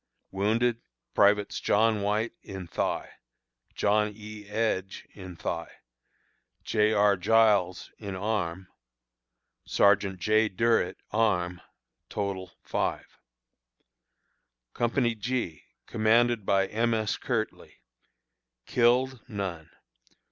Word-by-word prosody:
Wounded: 115 +4 +1 0.3
Privates 105 0 +3
John 110 0 +2
White, 105 +3 0
in 95 -2 -7
thigh; 85 - -2 0.6
John 105 +1 +2
E. 105 -1 -10
Edge, 105 -3 -2
in 95 -3 -9
thigh; 85 0 -4 0.9
J. 105 0 +2
R. 105 -1 +4
Giles, 100 -2 +2
in 100 -3 -5
arm; 95 -3 -2 1.0
Sergeant 100 -2 +3
J. 110 +4 +3
Durret, 115 -2 +1
arm. 90 -5 +1 0.5
Total, 95 -3 -3
5. - - -3 1.5
Company 120 0 +1
G, 110 - -3 0.2
commanded 115 0 +2
by 95 0 +3
M. 115 +3 0
S. 110 -2 0
Kirtley. 115 -4 -4 0.8
Killed: 125 +1 +2
None. 95 -8 -5
105 Hz, 90 wpm, -28 LUFS, 95-115 Hz, 1.5 s, R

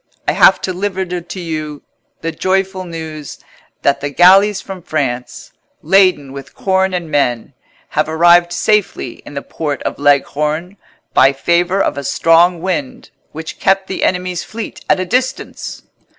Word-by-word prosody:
I - - +4
have - - +5
to 185 - -2
deliver 190 +1 -2
to 180 +1 -6
you 155 -4 -5 0.4
the 165 - -2
joyful 190 +2 -1
news 160 -3 -7 0.5
that 140 0 +2
the 145 - -2
galleys 190 +6 +5
from 190 -2 -8
France, 125 -6 -4 0.3
laden 185 -8 +3
with 140 0 -10
corn 190 -1 +1
and 170 -3 -4
men, 130 -3 0 0.4
have 150 +1 0
arrived 175 +2 +4
safely 205 - 0
in 145 - -10
the 140 - -4
port 150 -3 -4
of - - -4
Leghorn, 150 +5 0 0.4
by 135 +1 +5
favour 175 +6 +1
of 145 - 0
a - - -6
strong 170 +4 +3
wind, 255 +6 -3 0.2
which 160 +1 -8
kept 195 0 +2
the 190 - -4
enemy's 180 -1 -1
fleet 225 0 -8
at - - +3
a 185 - -1
distance." 250 +7 -3
175 Hz, 150 wpm, -16 LUFS, 150-190 Hz, 0.5 s, have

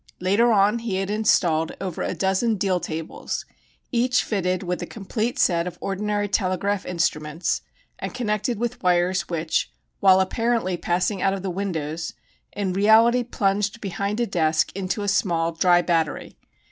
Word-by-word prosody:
Later 205 +6 +3
on 210 +2 +3
he 225 -4 -3
had 195 +1 -1
installed 175 -7 +2
over 185 -3 -4
a - - -2
dozen 195 +6 +1
deal 190 -2 0
tables, 160 -1 -5 0.5
each 250 0 +2
fitted 185 -2 -1
with 180 0 -3
a - - -4
complete 220 +3 -3
set 170 -1 +2
of 180 - -7
ordinary 205 +1 -1
telegraph 195 0 0
instruments 165 -2 -1 0.4
and - - -4
connected 215 -1 -1
with 240 +2 -3
wires 180 +1 +1
which, 165 -2 -1 0.3
while 190 -1 +6
apparently 225 0 0
passing 180 +3 -1
out 195 0 +2
of 195 - -7
the 190 - -2
windows, 165 -4 -3 0.4
in 195 -3 -2
reality 220 +5 +5
plunged 205 -2 -1
behind 200 +1 -3
a 240 - +2
desk 160 -5 +1
into 195 +2 -3
a - - -3
small 170 -4 +1
"dry" 175 +1 +3
battery. 165 -4 -1
195 Hz, 155 wpm, -23 LUFS, 175-210 Hz, 0.5 s, while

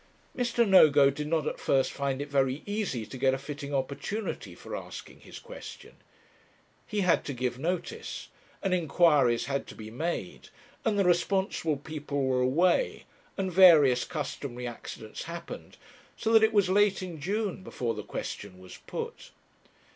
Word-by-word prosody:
Mr. 240 -2 +1
Nogo 145 -7 +7
did 150 +2 -5
not 160 -1 0
at - - -3
first 135 -1 +2
find 140 -1 -2
it - - -9
very 135 0 +1
easy 205 - -2
to 130 - -9
get 135 0 +3
a - - -3
fitting 140 +1 -7
opportunity 140 +10 -3
for - - -7
asking - - -8
his - - -11
question. - - -10 0.9
He 210 -2 -1
had 180 -3 +3
to 140 - -3
give 125 0 -2
notice, 185 - -4 0.3
and 195 -2 +1
inquiries 150 -7 +3
had 140 +1 -2
to - - -10
be 110 0 -9
made, 165 +9 -4 0.3
and 215 -2 +1
the 200 - +3
responsible 175 -3 +1
people 145 -1 -4
were 130 -1 +1
away, 170 - +2 0.3
and 190 -2 -2
various 155 -9 +7
customary 140 -6 -5
accidents 115 -2 -7
happened, 170 0 -8 0.4
so 225 0 0
that 225 - +8
it 220 0 +4
was 205 -3 +3
late 195 0 +3
in 175 -4 -7
June 200 +3 -2
before 120 -10 -3
the 105 - -5
question 100 -1 -6
was 95 0 -12
put. - - -6
150 Hz, 160 wpm, -29 LUFS, 135-190 Hz, 0.9 s, that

